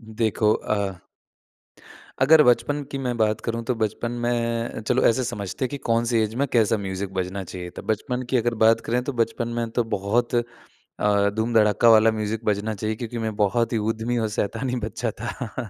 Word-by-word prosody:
देखो 110 -1 +2
अ 100 -3 -2 1.2
अगर 155 +4 +7
बचपन 125 +4 +2
की 140 - -3
मैं 125 -3 -2
बात 110 -1 +1
करूँ 115 0 -3
तो 125 - +1
बचपन 110 +2 -1
में 115 -1 -1
चलो 125 +1 +2
ऐसे 120 +3 +2
समझते 115 -1 -3
हैं - - -3
कि 145 - -4
कौन-सी 115 0 +2
ऐज 110 0 -1
में 140 - +2
कैसा 115 -1 +3
म्यूज़िक 95 -1 -4
बजना 95 +1 -3
चाहिए 90 0 -7
था? - - -9
बचपन 125 +4 -2
की 130 - +2
अगर 120 0 0
बात 115 +1 +5
करें 120 +2 +1
तो 140 - -3
बचपन 115 +1 0
में 115 -1 -2
तो 120 - +4
बहुत 110 +5 0 0.4
अ, 100 -1 0
धूम-धड़ाका 110 0 +3
वाला 110 0 +6
म्यूज़िक 110 +1 -3
बजना 105 +1 0
चाहिए 110 +2 -2
क्योंकि 120 +1 -6
मैं 110 -1 -3
बहुत 110 +4 +1
ही - - +2
उद्यमी 115 +2 -2
और 110 -2 0
शैतानी 125 +5 -2
बच्चा 110 +2 -3
था। 120 -1 -5
115 Hz, 185 wpm, -24 LUFS, 105-120 Hz, 1.2 s, अगर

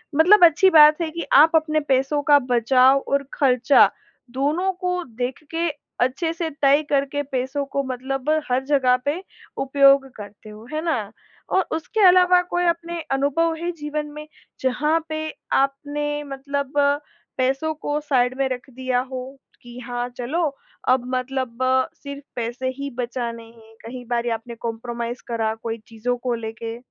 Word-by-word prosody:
मतलब 355 +6 +6
अच्छी 335 +4 +5
बात 305 -1 +7
है 330 - -1
कि 335 +1 -5
आप 305 +4 +7
अपने 310 -1 +2
पैसों 270 +2 +1
का 290 - +8
बचाव 255 +3 +4
और 280 0 +1
खर्चा 255 0 +4 0.4
दोनों 300 +9 0
को 360 -1 -1 0.2
देख 255 +5 -4
के 335 +1 0 0.4
अच्छे 295 +6 -2
से 330 -1 -3
तय 285 +2 +4
करके 280 0 0
पैसों 270 +1 -3
को 280 - +1
मतलब 265 +2 -4 0.2
हर 255 +1 +1
जगह 265 -3 +3
पे 300 +6 -1 0.4
उपयोग 275 0 +4
करते 205 +1 -11
हो, 215 +1 -12
है 310 - -1
ना? 225 -11 -1 0.4
और 380 - +2
उसके 325 +7 -2
अलावा 360 0 +6
कोई 355 0 0
अपने 340 0 -1
अनुभव 285 +5 +1
हैं 345 +1 -1
जीवन 300 0 -4
में, 300 0 -8 0.3
जहाँ 300 +5 +1
पे 310 0 -3 0.2
आपने 295 +2 -1
मतलब 280 0 -4 0.6
पैसों 270 +5 0
को 295 -1 -3
साइड 255 -4 +1
में 270 0 +1
रख 255 +1 -5
दिया 255 0 -1
हो 260 +1 -7 0.2
कि 240 0 -12
हाँ, 245 0 -4
चलो 265 +8 -2 0.5
अब 255 -1 +3
मतलब 255 -2 -3 0.5
सिर्फ 280 0 -7
पैसे 240 +2 -3
ही 280 0 -4
बचाने 235 -1 -4
हैं? 225 -1 -18
कहीं 245 +1 -8
बारी 240 0 -1
आपने 230 +1 -5
कंप्रोमाइज़ 235 +1 -5
करा 225 -2 -1
कोई 230 -1 -3
चीज़ों 235 +2 -3
को 245 0 -2
लेके? 225 0 -6
270 Hz, 155 wpm, -22 LUFS, 245-300 Hz, 0.6 s, का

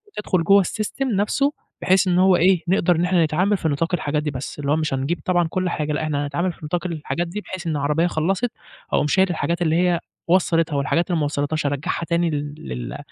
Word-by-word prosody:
تدخل 185 -5 0
جو 200 +3 +5
الsystem 215 +7 -3
نفسه، 275 +8 +1 0.3
بحيث 190 +1 +3
إن 180 -1 +2
هو 185 0 +5
إيه، 180 0 +3
نقدر 180 -1 +3
إن 170 +2 +1
إحنا 180 -2 +3
نتعامل 185 +7 +1
في 165 - -2
نطاق 165 +5 -1
الحاجات 150 -2 0
دي 150 - -2
بس، 135 +2 -6
اللي 140 0 -1
هو - - +4
مش 155 -3 -1
هنجيب 140 +6 -1
طبعًا 175 -2 +2
كل 185 +1 -1
حاجة 150 -2 -2
إحنا 145 -2 -1
هنتعامل 170 +5 -1
في - - -21
نطاق 175 +3 -2
الحاجات 170 +1 -3
دي، 200 +5 -5
بحيث 185 -3 -7
إن 155 -2 0
عربية 150 +4 +1
خلّصت، 190 +8 0 0.4
أقوم - - +2
شايل 190 +5 +3
الحاجات 170 0 -1
اللي 160 -2 +2
هي 175 0 +2 0.3
وصلّتها، 165 -3 +2
والحاجات 150 +5 +1
اللي 170 - +1
ما 150 - +1
وصلّتهاش 145 +1 -2
أرجّعها 145 +4 -2
تاني 170 0 +1
لل 145 - -5
170 Hz, 215 wpm, -22 LUFS, 150-185 Hz, 0.4 s, جو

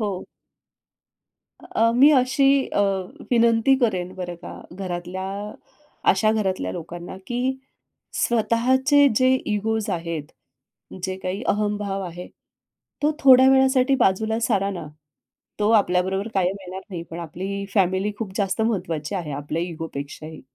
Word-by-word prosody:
हो. 200 -4 -3 1.4
अ, 230 +1 +1
मी 275 +5 +6
अशी 255 +2 +1 0.2
अ, - - 0 0.5
विनंती 235 +2 +4
करेन 185 -7 -1
बरं 175 -2 -6
का 170 - -10 0.2
घरातल्या 185 0 -5 0.9
अशा 215 +3 +2
घरातल्या 195 -4 -1
लोकांना 175 +1 -7
की 245 0 -2 0.8
स्वतःचे 260 +5 +3
जे 255 0 +4 0.2
इगोज 220 +1 -1
आहेत. 165 -3 -3 0.8
जे 190 0 -3
काही 190 +5 -3
अहम 210 0 +1
भाव 195 -1 -3
आहे 175 0 -7 0.8
तो 300 - +4
थोड्या 260 -1 +7
वेळासाठी 265 0 +4
बाजूला 220 +3 +1
सारा 200 -4 +1
ना. 175 -5 -6 0.7
तो 210 +1 +2
आपल्याबरोबर 190 0 +2
कायम 190 0 +1
येणार 185 0 -7
नाही 170 -2 -5
पण 165 - -6
आपली 190 +5 -5
फॅमिली 190 +1 +2
खूप 210 -4 -5
जास्त 200 +2 0
महत्त्वाची 180 -8 -2
आहे 165 -6 -3
आपल्या 145 +4 -3
इगो 165 -2 -5
पेक्षाही. 155 +3 -7
195 Hz, 130 wpm, -23 LUFS, 180-230 Hz, 1.4 s, थोड्या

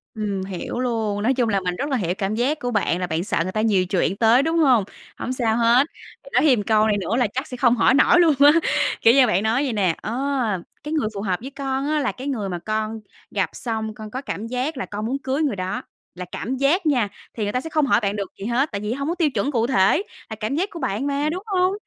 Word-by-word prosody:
Ừm, 205 -3 -2
hiểu 190 +5 -5
luôn, 220 -4 -1
nói 260 +4 +3
chung 245 -3 +1
là 200 -2 +2
mình 180 -1 -2
rất 285 +9 -3
là 265 - +1
hiểu 180 -5 -1
cảm 200 +1 -1
giác 275 +6 0
của 245 0 -3
bạn 195 -5 0
là 180 - -2
bạn 165 +1 -1
sợ - - -2
người 185 - -4
ta 215 - -1
nhiều 200 -5 +2
chuyện 185 +1 0
tới, 230 +4 +4
đúng 325 +2 0
hông? 260 -10 +4 0.3
Hổng 255 - -3
sao 230 -3 0
hết, 240 +5 +4 0.4
bạn - - -13
nói - - +4
thêm 255 -7 +5
một - - -2
câu 215 0 +3
này 210 - +2
nữa 205 +3 -2
là 245 -3 +2
chắc 260 +8 -4
sẽ 250 - -7
không 245 -1 +4
hỏi 240 - +4
nổi 315 +6 +5
luôn 325 -4 +5
á. 285 +1 +8 0.5
Kiểu 230 - +6
như, 265 -2 +6
bạn 195 -1 +1
nói 230 +6 +1
vậy 260 -5 -1
nè: 185 -6 +1
"Ờ, 215 - -4 0.7
cái 300 - -4
người 300 -8 +1
phù 200 - -4
hợp 185 -3 -1
với 265 - -6
con 275 0 -3
á 305 0 +1
là 265 - 0
cái 265 +2 -8
người 215 -8 -2
mà 175 -1 -4
con 215 +3 -3 0.3
gặp - - 0
xong 220 -2 -3
con 215 0 -9
có 255 - -4
cảm 225 -5 -5
giác 255 +5 -2
là - - -3
con 210 +1 -5
muốn 265 +4 -1
cưới 270 +3 -2
người 275 -9 0
đó." 185 +2 -3 0.3
Là 180 0 -6
cảm 260 +3 -3
giác 300 +8 +2
nha, 255 -8 +2 0.3
thì 220 - -3
người 205 - -1
ta 250 - -1
sẽ 325 - -7
không 305 -2 +2
hỏi 265 - +3
bạn 200 0 -1
được 200 -3 -4
gì 195 - -6
hết, 245 +6 +1
tại 200 -2 -4
vì 210 +2 -2
hông 280 +2 -3
có 340 - -1
tiêu 330 -4 +2
chuẩn 280 +1 -1
cụ 235 -3 +1
thể, 260 - +3 0.3
là 220 - -5
cảm 220 +6 -2
giác 380 +6 0
của 340 - -8
bạn 260 -1 -2
mà, 285 +1 0
đúng 365 +4 -4
hông? 375 -3 +1
235 Hz, 285 wpm, -22 LUFS, 210-275 Hz, 0.7 s, á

